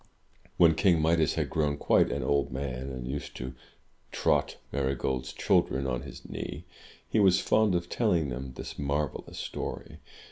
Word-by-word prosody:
When 85 -2 +7
King 85 0 +3
Midas 80 -1 +2
had - - -1
grown 75 -2 +1
quite - - +3
an 70 -2 -2
old 70 +2 +1
man, 65 0 -4
and 65 -2 -6
used 70 +2 -5
to 65 +1 -5 0.6
trot - - +1
Marygold's 65 -2 -1
children 65 +1 +1
on 60 -2 -1
his 70 - -10
knee, - - -6 0.4
he 110 - +1
was 95 -3 +5
fond 110 -4 +3
of 85 0 -1
telling 85 - +1
them 65 +1 -5
this - - -7
marvellous 70 0 -2
story. - - -5
70 Hz, 155 wpm, -29 LUFS, 65-80 Hz, 0.6 s, When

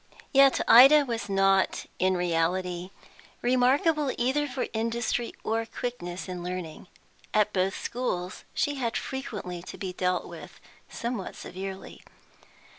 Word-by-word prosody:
Yet 275 0 +6
Ida 275 +5 +9
was 230 -4 -4
not 195 -1 +2
in 185 0 +2
reality 175 +1 -1 0.5
remarkable 265 +4 +3
either 265 +5 +1
for 260 -1 -3
industry 230 +1 -1
or 225 +1 0
quickness 200 -7 -5
in 180 -1 -5
learning. 180 -1 -6 0.5
At 210 0 +3
both 190 +1 0
schools 185 -7 -3
she 290 -1 0
had 235 -1 -1
frequently 205 -10 -5
to 180 - -9
be 185 -2 -5
dealt 180 0 0
with - - -11 0.3
somewhat 235 -5 -4
severely. 190 +1 -8
210 Hz, 120 wpm, -27 LUFS, 180-250 Hz, 0.5 s, Ida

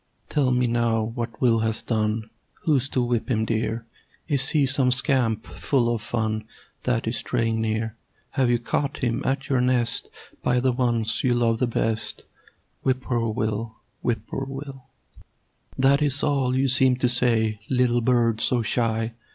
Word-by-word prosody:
Tell 140 -4 +2
me 125 0 +2
now 115 -2 +1
what 115 0 -5
Will 115 -3 +3
has 110 0 -1
done. 110 -1 -1 0.4
Who's 140 -5 +2
to 130 - 0
whip 120 -1 -1
him, 110 -3 +1
dear? 115 0 -2 0.4
Is 140 -4 +2
he 150 -3 +3
some 135 -1 +3
scamp 125 -3 +2
full 120 -4 0
of 115 - -3
fun 110 -2 -2 0.4
That 125 -2 0
is 115 +1 -1
straying 115 -2 -1
near? 110 0 -2 0.4
Have 130 -3 +1
you 120 - +3
caught 140 +4 -2
him 120 +1 0
at 135 +1 -1
your 130 -3 +2
nest 125 -2 +2 0.3
By 125 - +2
the 130 +1 +2
ones 120 -3 0
you 125 -2 +3
love 115 -1 +1
the 125 - +2
best? 110 -1 -2 0.6
"Whip 130 -1 0
poor 120 -3 -1
Will! 110 +1 -2 0.3
Whip 115 -3 0
poor 135 - -4
Will!" 135 -1 -8 0.9
That 135 +2 +4
is 140 -2 +2
all 135 -3 +1
you 135 +1 +2
seem 130 0 +3
to 125 0 +1
say, 115 -3 +1
Little 125 -2 +2
bird 115 -2 +2
so 120 -2 +2
shy. 115 0 0
120 Hz, 165 wpm, -24 LUFS, 115-130 Hz, 0.9 s, That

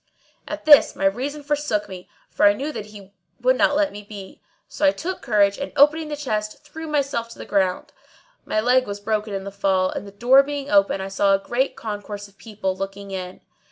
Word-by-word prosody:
At - - -6
this, 295 -2 +7
my 195 - -2
reason 270 +9 -1
forsook 285 -8 -1
me, 185 -1 -10 0.2
for 205 - +3
I 205 - +5
knew 280 +8 -4
that 210 -8 -7
he 200 -2 -14 0.3
would 255 +1 +3
not 290 - +3
let 300 0 +2
me 205 - -8
be; 200 -2 -11 0.3
so - - -7
I 290 - +7
took 365 +5 -5
courage 205 -4 +2
and 280 - -4
opening 305 +3 +4
the 300 - -4
chest 215 -5 -4
threw 320 +2 -8
myself 275 -6 -1
to 230 - -12
the - - -8
ground. 190 -2 -1 0.5
My 215 - -1
leg 250 +2 +3
was 200 0 -5
broken 215 0 -2
in 195 -1 -4
the 200 - -7
fall, 190 -1 +1
and 205 - -6
the - - -10
door 245 +7 +5
being 285 0 -5
open 195 -1 +3
I 190 - -4
saw 195 0 +2
a 195 - -6
great 255 +3 0
concourse 205 -1 -6
of 195 -1 -25
people 205 -4 -4
looking 195 +1 -6
in. 185 -1 -6
210 Hz, 220 wpm, -22 LUFS, 200-280 Hz, 0.5 s, this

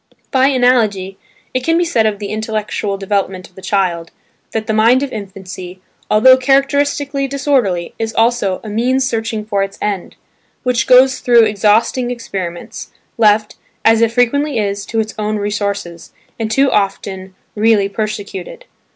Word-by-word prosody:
By 265 0 +4
analogy, 225 -8 +1 0.3
it 255 - -1
can 330 +3 +2
be 350 - +2
said 230 -10 +2
of 210 -1 -1
the 200 -1 -6
intellectual 215 -2 -3
development 195 -2 -2
of - - -32
the 190 - -13
child, 180 -4 -1 0.4
that 220 -1 -3
the 220 - -1
mind 230 +5 +4
of 280 - -4
infancy, 190 -3 -8 0.3
although 255 +5 +6
characteristically 275 +1 +1
disorderly, 260 - 0
is 225 0 -2
also 225 -5 +1
"a - - -8
means 255 +5 +1
searching 225 -2 -3
for 200 -2 -1
its 195 0 -4
end," 200 -3 -3 0.5
which 250 -2 0
goes 255 +1 +5
through 240 -2 +5
exhausting 215 +4 +1
experiments, 190 -8 -6 0.3
left, 210 -1 +3 0.3
as 225 0 +5
it 230 -1 +3
frequently 255 +4 +1
is, 200 -2 -2
to 225 - -2
its 220 0 -2
own 215 0 -1
resources, 200 -4 -4 0.3
and 225 -1 -2
too 270 +4 +2
often 195 -2 -2 0.2
really 210 -2 +3
persecuted. 215 - -5
220 Hz, 150 wpm, -16 LUFS, 200-250 Hz, 0.5 s, although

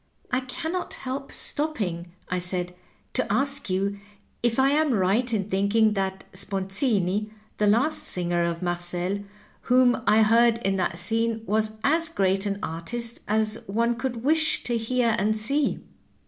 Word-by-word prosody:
" - - -44
I 250 - +2
can 265 +5 -5
not 365 0 -3
help 270 +1 -5
stopping," 195 - +1 0.2
I 180 - -1
said, 180 0 -3 0.2
" - - -39
to - - -1
ask 280 -3 0
you 200 +2 -1 0.4
if 235 -1 +1
I 265 +1 +4
am 300 -3 +2
right 210 +6 +1
in 205 -4 -1
thinking 210 +2 +2
that 190 -1 -2
Sponzini, 195 +1 -1 0.3
the 210 - +3
last 240 +10 +2
singer 175 -1 0
of 170 0 -2
Marcel 175 +2 -1 0.5
whom 250 -1 +4
I 220 +1 +5
heard 230 +1 +4
in 195 0 +1
that 175 -2 -1
scene, 225 +2 +1
was 215 0 0
as 325 +3 +2
great 195 - +1
an 200 0 -2
artist 230 +9 -4
as 215 0 0
one 230 +4 +1
could 245 -2 -4
wish 310 +2 +2
to 240 - 0
hear 230 0 +1
and 215 +2 +1
see?" 275 +8 0
215 Hz, 160 wpm, -25 LUFS, 190-250 Hz, 0.5 s, I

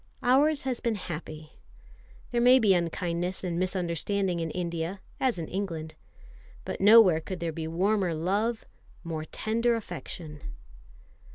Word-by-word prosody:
Ours 280 +4 +3
has 260 -2 -2
been 235 -2 -1
happy. 155 -4 -7 0.8
There 240 -1 +1
may 250 +2 +7
be 215 -6 +4
unkindness 175 +1 -1
and 175 -2 -2
misunderstanding 185 0 -1
in 165 -1 -2
India, 170 +2 -3 0.2
as 255 -6 +1
in 165 -2 -4
England; 165 -5 -4 0.7
but - - -5
nowhere 205 -5 +7
could 185 +2 -6
there 170 -1 -2
be 160 0 -5
warmer 185 +1 +1
love, 205 +8 -1 0.4
more 160 -2 -4
tender 230 +6 0
affection. 160 -8 -7
185 Hz, 130 wpm, -28 LUFS, 165-220 Hz, 0.8 s, may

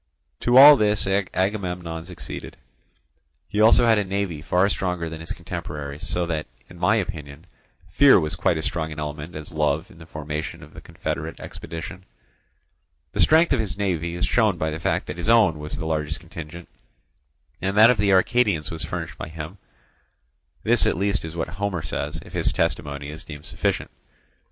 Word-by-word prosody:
To 120 +1 +3
all 145 +2 +11
this 105 -2 +2
Agamemnon 90 -3 -1
succeeded. 90 -1 -8 0.9
He 105 - -3
had 110 - +7
also 115 +2 +6
a 110 -3 +4
navy 95 -5 -3
far 90 +4 +2
stronger 90 -4 -2
than 80 0 -7
his 80 -1 -9
contemporaries, 75 +3 -6
so 90 0 0
that, 80 -2 -3 0.2
in - - -14
my - - +3
opinion, 75 +1 -4 0.4
fear 135 +6 +6
was 75 -2 -2
quite 85 0 +1
as 80 - -3
strong 80 -2 -2
an 75 - -7
element 75 +2 -6
as 75 +1 -7
love 75 +2 0
in 85 - -16
the 80 - -12
formation 75 0 -5
of - - -14
the - - -10
confederate - - -5
expedition. 85 +3 -8 1.1
The - - -6
strength 160 +1 +5
of 130 - +1
his 110 -3 -2
navy 85 -4 -1
is 85 - 0
shown 110 -6 +2
by 80 -1 -1
the 80 - -5
fact - - 0
that 75 - -6
his 85 - -2
own 105 -9 +5
was 75 0 -6
the - - -4
largest 80 -1 -2
contingent, 85 0 -9 0.9
and 95 +2 -1
that 110 +3 +9
of 125 - -1
the 100 0 +3
Arcadians 95 -3 +2
was 80 -1 -4
furnished - - -5
by - - -5
him; 80 +4 -8 1.0
this - - +4
at - - +1
least 100 +1 0
is 80 0 -7
what 80 - -2
Homer 95 -2 -3
says, 75 +1 -4
if - - -14
his - - +1
testimony 70 -1 -2
is 80 +3 -8
deemed 75 -3 -10
sufficient. - - -2
85 Hz, 185 wpm, -24 LUFS, 80-100 Hz, 1.1 s, all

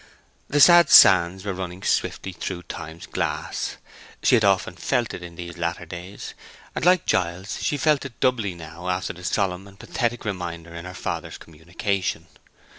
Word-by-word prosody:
The 145 - +1
sad 175 +2 +8
sands 95 +1 +7
were 100 - -2
running 90 0 -6
swiftly 95 - -1
through 90 0 -5
Time's 80 -1 -8
glass; - - -3 0.5
she - - +4
had 115 -3 +5
often 100 -2 +2
felt - - -1
it - - -7
in 85 -1 -10
these 85 0 -8
latter 85 0 -2
days; 90 +4 -8 0.4
and, - - -4
like 180 0 +4
Giles, 90 +3 -1
she 145 - 0
felt 150 -1 +2
it 135 -4 -9
doubly 110 -8 +1
now 85 +2 -8
after 90 0 -2
the 90 - -13
solemn 95 0 -1
and 100 0 -16
pathetic 120 -1 -2
reminder 85 -4 -5
in 85 +1 -8
her 90 0 -8
father's - - -4
communication. 85 +4 -3
90 Hz, 170 wpm, -24 LUFS, 85-105 Hz, 0.5 s, sad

